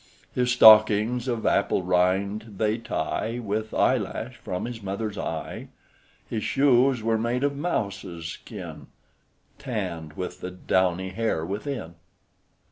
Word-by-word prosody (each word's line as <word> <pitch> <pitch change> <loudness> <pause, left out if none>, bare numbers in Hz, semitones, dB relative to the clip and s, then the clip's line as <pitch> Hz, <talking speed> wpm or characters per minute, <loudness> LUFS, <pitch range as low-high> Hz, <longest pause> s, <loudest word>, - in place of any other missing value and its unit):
His 125 0 +1
stockings, 110 +1 +6
of 120 -3 -2
apple 100 -1 +2
rind, 95 +4 0
they 110 +2 +1
tie 110 +4 -2
With 110 -1 -3
eyelash 125 0 0
from 90 -3 -4
his 120 -1 -6
mother's 100 +2 -3
eye: 80 -5 -5 0.6
His 110 -2 -3
shoes 130 -3 +3
were 110 0 +1
made 120 +3 -1
of 140 0 +1
mouses' 100 - -3
skin, 80 - -8 0.7
Tann'd 80 -2 -4
with 90 +2 -6
the 90 - -4
downy 95 0 0
hair 95 -5 -1
within." 105 - -4
110 Hz, 125 wpm, -26 LUFS, 95-120 Hz, 0.7 s, stockings